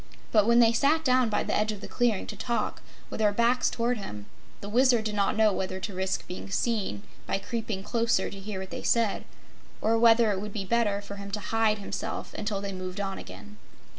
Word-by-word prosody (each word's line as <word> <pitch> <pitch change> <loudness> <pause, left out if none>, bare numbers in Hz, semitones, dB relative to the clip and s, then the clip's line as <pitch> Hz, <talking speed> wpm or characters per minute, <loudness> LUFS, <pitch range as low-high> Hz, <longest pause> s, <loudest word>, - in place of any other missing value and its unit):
But 215 -1 +4
when 235 0 +5
they 235 -1 +6
sat 310 +6 +2
down 255 -2 +4
by 210 - 0
the - - -1
edge 215 +1 +1
of 210 - -6
the - - -8
clearing, 240 -5 +1
to 210 - -7
talk, 235 +3 -2 0.3
with - - -5
their 210 -1 +4
backs 235 +4 +2
toward 235 0 -1
him, 105 - -7 0.3
the 200 - -8
Wizard 240 +1 +4
did 215 - -1
not 205 0 +1
know 215 -2 +4
whether 185 0 -3
to 195 +1 -5
risk 190 +1 -2
being 180 +2 -7
seen, 195 - -1 0.2
by - - 0
creeping 210 -1 -4
closer 230 -3 +1
to 195 - -8
hear 195 -1 -5
what 190 - -8
they - - -5
said, 230 -4 +1 0.5
or 225 +1 +2
whether 230 -1 +6
it 195 -1 -2
would 210 0 -6
be 195 -3 -3
better 210 -2 +1
for 200 0 -9
him 200 0 -7
to 205 +2 -3
hide 220 +1 +1
himself 200 - -5
until 205 -2 -3
they 200 -1 -4
moved 185 0 -6
on 195 -1 -3
again. 100 +3 -11
210 Hz, 225 wpm, -28 LUFS, 195-230 Hz, 0.5 s, they